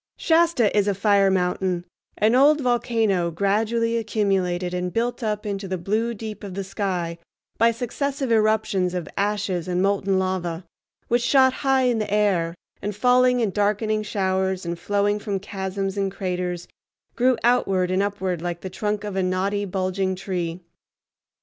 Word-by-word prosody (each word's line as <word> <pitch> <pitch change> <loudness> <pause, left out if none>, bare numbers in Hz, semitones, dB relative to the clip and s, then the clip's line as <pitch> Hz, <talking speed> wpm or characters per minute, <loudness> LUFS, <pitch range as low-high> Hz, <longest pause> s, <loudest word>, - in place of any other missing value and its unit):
Shasta 325 -11 +3
is 205 -1 +3
a 200 - +1
fire 200 -1 +3
mountain, 180 -1 0 0.3
an 215 +2 +3
old 290 +4 +5
volcano 225 -8 +1
gradually 220 +6 0
accumulated 195 -5 0
and 180 0 -2
built 240 +5 -1
up 210 -2 -2
into 200 -1 -3
the 185 0 -2
blue 220 +6 -1
deep 215 -1 -7
of 195 -3 -7
the 195 - -3
sky 185 -4 -3 0.4
by 230 - +6
successive 260 +3 -2
eruptions 215 -4 +2
of 175 -4 -3
ashes 200 -4 -1
and 180 0 0
molten 195 0 +1
lava 185 -2 -2 0.4
which, 240 +1 +2
shot 260 +1 +4
high 270 -1 +1
in 245 -3 +2
the 210 -2 -3
air 190 -5 +1 0.3
and 205 0 -3
falling 250 +2 +4
in 215 -4 +1
darkening 215 +2 0
showers, 190 -2 -1
and 170 0 -4
flowing 205 +2 0
from 200 -2 -3
chasms 195 0 -4
and 195 -1 0
craters, 180 -2 -3 0.5
grew 250 0 +3
outward 195 -7 +2
and 185 +1 +2
upward 190 -4 -2
like 175 0 -4
the 190 - -6
trunk 210 +2 -2
of 205 -2 -5
a 190 - +1
knotty, 190 +3 0
bulging 185 0 -1
tree. 180 -2 -4
200 Hz, 160 wpm, -23 LUFS, 185-220 Hz, 0.5 s, by